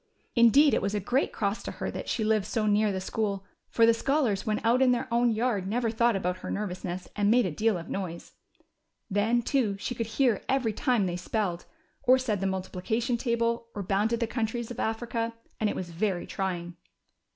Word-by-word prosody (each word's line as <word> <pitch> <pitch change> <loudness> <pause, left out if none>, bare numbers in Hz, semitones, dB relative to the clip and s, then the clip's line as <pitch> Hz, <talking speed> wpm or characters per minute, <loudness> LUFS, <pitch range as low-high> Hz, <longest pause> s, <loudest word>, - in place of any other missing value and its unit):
Indeed 260 +5 +6
it - - +2
was 200 +2 -1
a - - +1
great 245 +8 0
cross 200 0 -1
to - - -6
lier - - -2
that - - -6
she 220 - 0
lived 215 -2 +1
so 220 0 -1
near 210 0 +3
the 190 - -2
school, 200 0 -2 0.2
for 230 - +4
the 230 - +6
scholars 240 -4 0
when 215 0 +1
out 240 +3 +4
in 255 -1 +5
their 240 - -2
own 240 +1 +4
yard 220 -4 0
never 230 +2 0
thought 235 0 +2
al)out 180 -1 -1
her - - -7
nervous 195 -3 -3
ness, 180 0 -4
and 205 -1 +2
made 240 +1 +4
a 185 - -1
deal 215 +5 +1
of 170 - -8
noise. 175 -4 -5 0.8
Then, 225 +4 +2
too, 225 -7 +1
she 225 - -3
could 230 -2 -3
hear 230 -2 +2
every 260 -5 +1
time 240 -3 +1
they 175 -1 -2
spelled, 180 -1 -2 0.4
or 255 +1 +5
said 235 -6 -1
the 195 - +1
multiplication 195 +6 -1
table, 235 -1 0
or 205 - -3
bounded 210 +5 +1
the 235 - +1
countries 230 0 -3
of 245 - -7
Africa, 230 +1 -2 0.3
and 215 - +2
it - - -3
was 175 -2 -5
very 180 +1 -1
trying. 175 -3 -4
220 Hz, 210 wpm, -28 LUFS, 195-235 Hz, 0.8 s, Indeed